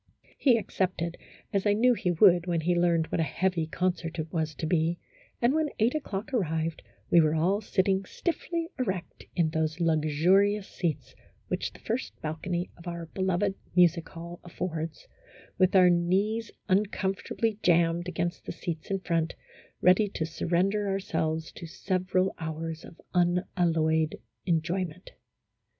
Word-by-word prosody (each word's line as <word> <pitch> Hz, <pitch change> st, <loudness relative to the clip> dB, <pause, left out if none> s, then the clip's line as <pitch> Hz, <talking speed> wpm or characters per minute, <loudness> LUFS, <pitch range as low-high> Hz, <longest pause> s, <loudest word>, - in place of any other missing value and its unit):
He 250 Hz, -5 st, +4 dB
accepted, 185 Hz, -5 st, -2 dB, 0.4 s
as 200 Hz, +1 st, +1 dB
I 205 Hz, -, +5 dB
knew 245 Hz, +4 st, +4 dB
he 185 Hz, -, -1 dB
would 175 Hz, 0 st, +5 dB
when 170 Hz, -2 st, +1 dB
he 175 Hz, +3 st, +2 dB
learned 170 Hz, -2 st, +3 dB
what -, -, 0 dB
a -, -, +3 dB
heavy 170 Hz, 0 st, 0 dB
concert 175 Hz, 0 st, -2 dB
it 160 Hz, 0 st, -4 dB
was 160 Hz, -2 st, -1 dB
to 150 Hz, -, -4 dB
be, 165 Hz, +1 st, +1 dB, 0.4 s
and, 240 Hz, +3 st, +3 dB
when 315 Hz, -1 st, +1 dB
eight 225 Hz, +3 st, +3 dB
o'clock 230 Hz, -7 st, -4 dB
arrived, 160 Hz, -7 st, -1 dB, 0.3 s
we 170 Hz, -, +7 dB
were 155 Hz, 0 st, +2 dB
all 185 Hz, +6 st, +2 dB
sitting 190 Hz, -1 st, +1 dB
stiffly 335 Hz, -, -3 dB
erect 190 Hz, -8 st, -3 dB
in 165 Hz, -3 st, +2 dB
those 160 Hz, 0 st, -1 dB
luxurious 170 Hz, +6 st, +3 dB
seats 165 Hz, -5 st, -3 dB, 0.4 s
which -, -, -2 dB
the -, -, -15 dB
first 100 Hz, +5 st, -4 dB
balcony 170 Hz, +3 st, -3 dB
of 170 Hz, +1 st, -12 dB
our 170 Hz, -1 st, -4 dB
beloved 190 Hz, +1 st, +1 dB, 0.2 s
Music 175 Hz, -2 st, +4 dB
Hall 170 Hz, +1 st, -8 dB
affords, 165 Hz, -3 st, -5 dB, 0.5 s
with 185 Hz, +1 st, +4 dB
our 180 Hz, -1 st, +7 dB
knees 200 Hz, +6 st, +1 dB, 0.2 s
uncom 195 Hz, 0 st, +1 dB
fortably 220 Hz, +2 st, -2 dB
jammed 170 Hz, 0 st, +3 dB
against 175 Hz, -1 st, -3 dB
the -, -, -2 dB
seats 165 Hz, -3 st, -5 dB
in 195 Hz, -1 st, -1 dB
front, 165 Hz, -3 st, 0 dB, 0.5 s
ready 185 Hz, +4 st, +5 dB
to 160 Hz, -, 0 dB
surrender 185 Hz, +6 st, 0 dB
ourselves 160 Hz, -5 st, -1 dB
to 170 Hz, -, -9 dB
several 185 Hz, +2 st, 0 dB
hours 160 Hz, 0 st, -4 dB
of 165 Hz, -, -13 dB
unalloyed 170 Hz, -3 st, +2 dB, 0.3 s
enjoyment. 170 Hz, +1 st, -1 dB
175 Hz, 150 wpm, -28 LUFS, 165-195 Hz, 0.5 s, we